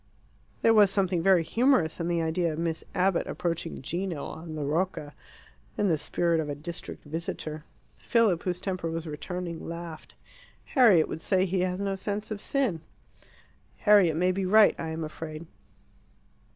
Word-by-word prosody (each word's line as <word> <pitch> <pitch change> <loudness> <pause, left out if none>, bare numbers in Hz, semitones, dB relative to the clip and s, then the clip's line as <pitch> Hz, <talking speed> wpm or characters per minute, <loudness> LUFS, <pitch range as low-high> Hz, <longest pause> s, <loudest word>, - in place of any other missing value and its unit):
There 225 - +6
was 210 -3 +6
something 190 -3 +1
very 185 -1 +4
humorous 225 - +2
in 170 - -2
the 170 -1 0
idea 165 +1 0
of 155 - -5
Miss 165 -1 -2
Abbott 185 -1 +1
approaching 165 -4 -3
Gino, 170 0 -3
on 160 -1 -7
the 150 - -3
Rocca, 150 0 -2 0.6
in 205 - +2
the 165 - +3
spirit 170 +2 +1
of 155 -2 -2
a 145 - -3
district 165 +4 -7
visitor. 155 -1 -5 0.3
Philip, 220 -8 +2
whose 180 -1 -2
temper 185 -3 -3
was 165 0 -4
returning, 170 +2 -5
laughed. 170 -1 -8 0.6
"Harriet 220 - +6
would 160 - -6
say 190 +1 +2
he 190 0 -1
has 180 0 -1
no 200 -1 -1
sense 205 +2 -4
of 205 -1 -4
sin." 250 - 0 1.0
"Harriet 200 -7 +5
may 180 +3 +2
be 190 +1 -2
right, 210 +3 +6
I 165 - -3
am 160 0 -4
afraid." 155 +1 -7
175 Hz, 165 wpm, -27 LUFS, 160-195 Hz, 1.0 s, There